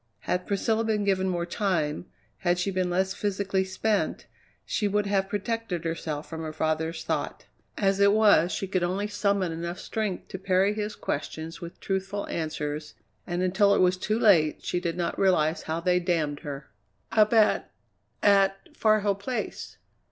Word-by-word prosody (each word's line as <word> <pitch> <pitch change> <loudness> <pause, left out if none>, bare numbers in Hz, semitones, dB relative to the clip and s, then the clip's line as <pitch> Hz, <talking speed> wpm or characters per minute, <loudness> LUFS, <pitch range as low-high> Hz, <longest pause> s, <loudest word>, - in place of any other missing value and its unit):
Had 180 0 -2
Priscilla 220 +3 +1
been 215 -2 0
given 190 -1 +1
more 175 -1 -1
time, 175 -5 -1 0.3
had 175 -1 +1
she 180 +3 -1
been 185 -1 0
less 190 +2 +1
physically 195 -1 -1
spent, 200 +3 -1 0.4
she 210 - 0
would 205 +1 +1
have 195 -1 0
protected 205 -4 -2
herself 160 -2 -3
from 160 -1 -6
her 160 -1 -4
father's 160 +1 -1
thought; - - -3 0.3
as 195 -1 +2
it 200 0 +6
was 205 -5 +5
she 195 - -2
could 185 -1 0
only 185 +4 0
summon 200 -3 0
enough 170 +2 -4
strength 215 -4 -3
to 190 - -6
parry 190 +2 +2
his 210 0 -3
questions 160 +3 -4
with 170 0 -9
truthful 195 +1 -3
answers, 150 -2 -4 0.3
and 175 0 -1
until 200 +2 +4
it - - +1
was 180 0 +4
too 215 +4 -1
late 180 -10 +4
she 180 - 0
did 170 -1 -3
not 170 -1 -2
realize 170 -5 +3
how 160 +1 -3
they 180 +1 +2
damned 160 -5 0
her. 140 -4 -7 0.4
"Up 215 -2 +4
at 220 -2 +3 0.5
at 195 -1 +3
Far 215 -1 +3
Hill 200 0 +2
Place." 200 +6 -5
190 Hz, 170 wpm, -27 LUFS, 170-200 Hz, 0.5 s, it